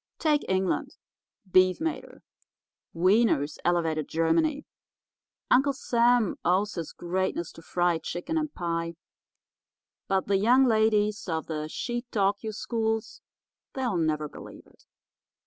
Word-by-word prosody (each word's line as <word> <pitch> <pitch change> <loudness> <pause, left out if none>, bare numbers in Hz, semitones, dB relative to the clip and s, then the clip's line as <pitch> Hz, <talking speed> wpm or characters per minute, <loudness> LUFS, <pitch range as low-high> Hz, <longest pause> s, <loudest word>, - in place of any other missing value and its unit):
Take 300 -2 +2
England—beef 185 0 0
made 325 0 -2
her; - - -17 0.7
wieners 180 -5 +2
elevated 165 -4 0
Germany; 165 - +1 0.9
Uncle 275 +2 +4
Sam 240 -4 +2
owes 190 +4 +1
his 165 -3 -5
greatness 175 -1 -2
to - - -13
fried 175 0 0
chicken 225 - -4
and 310 -2 -1
pie, 170 -3 -3 1.1
but 195 -1 +1
the 200 -1 +2
young 245 +7 +5
ladies 215 -3 +2
of 160 -1 -2
the 155 -1 -4
Shetalkyou 220 -2 -2
schools, 220 0 -2 0.5
they'll 250 -6 -1
never 155 -2 0
believe - - -12
it. - - -25
195 Hz, 115 wpm, -27 LUFS, 170-235 Hz, 1.1 s, young